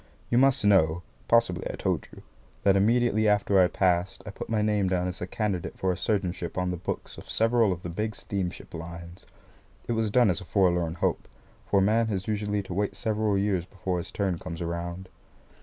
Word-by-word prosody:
You 120 - +4
must 135 -5 +4
know 90 -4 +4 0.2
(possibly 115 -7 +3
I - - -6
told - - -1
you), - - -13 0.4
that 100 -1 +5
immediately 110 +1 +3
after 100 -1 +3
I 90 - +6
passed, 90 0 0
I 105 - -6
put - - -8
my 110 -2 +1
name 105 -2 +2
down 90 -1 0
as 90 0 -6
a 90 - -3
candidate 100 -3 -2
for 95 - 0
a - - -1
surgeonship 90 -3 -2
on 90 0 0
the - - -2
books 85 - -5
of - - -13
several 115 -2 +3
of 90 -1 -4
the 90 - -4
big 105 +5 -3
steamship 95 -4 -4
lines. 85 +2 -9 0.6
It - - -1
was 110 -2 +1
done 120 -1 +4
as 95 - -2
a - - -9
forlorn 90 -4 +1
hope, - - -1 0.4
for 100 - +3
a - - +3
man 110 +3 +3
has 95 -3 -3
usually 105 -1 -1
to 95 - -7
wait 100 +2 -1
several 110 -3 0
years 95 -3 0
before 95 -2 -3
his 90 +2 -6
turn 95 -4 -1
comes 85 -2 -7
round. 85 +2 -4
95 Hz, 205 wpm, -27 LUFS, 90-105 Hz, 0.6 s, I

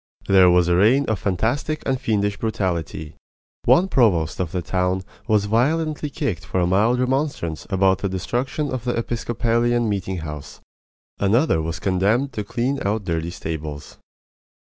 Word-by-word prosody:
There 95 -2 +6
was 90 -1 +4
a 85 - +3
reign 115 +10 +4
of 110 -6 -1
fantastic 120 - -1
and 130 -1 -1
fiendish 105 -2 0
brutality. 85 -8 -3 0.5
One 180 +3 +5
provost 100 - +2
of 90 -4 -2
the 90 -2 -3
town 90 +1 -1 0.2
was 105 -3 +2
violently 150 +7 0
kicked 140 - -3
for 95 - -2
a 90 - +2
mild 105 +7 +2
remonstrance 125 - -1
about 95 -1 +2
the 100 - -2
destruction 130 +10 -2
of 130 -3 -3
the 120 -1 -1
Episcopalian 120 0 0
meeting 95 -2 -2
house; 75 -3 -7 0.6
another 105 - +2
was 80 +1 -3
condemned 100 - +1
to 105 - -3
clean 125 +7 -2
out 105 +2 -1
dirty 85 -2 -2
stables. 80 -4 -6
100 Hz, 150 wpm, -22 LUFS, 90-120 Hz, 0.6 s, There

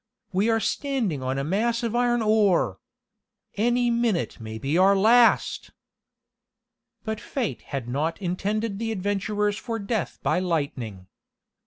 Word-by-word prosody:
"We 200 +5 +2
are 225 0 +3
standing 230 - -1
on 130 +1 -2
a 135 - -1
mass 230 - 0
of 230 0 -1
iron 240 -1 +2
ore! 200 - +2 0.7
Any 240 +2 +2
minute 235 - 0
may 110 -1 -7
be 135 +7 -2
our 190 +3 +5
last!" 230 +4 +4 1.3
But 220 -1 -3
fate 255 -6 -3
had 135 -4 -5
not 150 +8 -2
intended 200 +3 -2
the 225 0 -2
adventurers 205 +1 -1
for 230 -2 -4
death 210 -2 -3
by - - +2
lightning. 140 - -3
205 Hz, 135 wpm, -25 LUFS, 165-230 Hz, 1.3 s, our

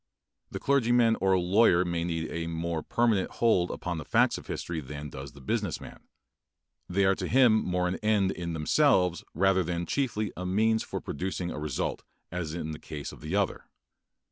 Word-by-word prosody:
The - - -5
clergyman 120 -4 +3
or 95 -1 +4
lawyer 90 0 +4
may 85 -1 -1
need 80 -2 -3
a 85 0 -3
more 85 0 -2
permanent 115 -2 +1
hold 100 -7 +2
upon 90 -2 -4
the - - -5
facts - - +2
of - - -14
history 85 -1 -4
than 75 +1 -7
does 70 -1 -8
the 70 - -14
business - - -2
man. - - -11 0.9
They 95 +2 +2
are 95 - +5
to - - -4
him 120 -3 +5
more 90 0 0
an 90 - -2
end 105 -3 +2
in 85 -1 -4
themselves 90 - +2
rather 95 +2 +3
than 85 0 -2
chiefly 110 - -1
a 90 - -5
means 110 +4 +2
for - - -5
producing 90 +2 -3
a - - -5
result, 75 -4 -2 0.3
as 85 -2 -4
in 80 -2 -4
the 75 - -7
case 75 -2 -7
of - - -13
the 80 +5 -3
other. 100 -1 0
90 Hz, 190 wpm, -28 LUFS, 80-105 Hz, 0.9 s, are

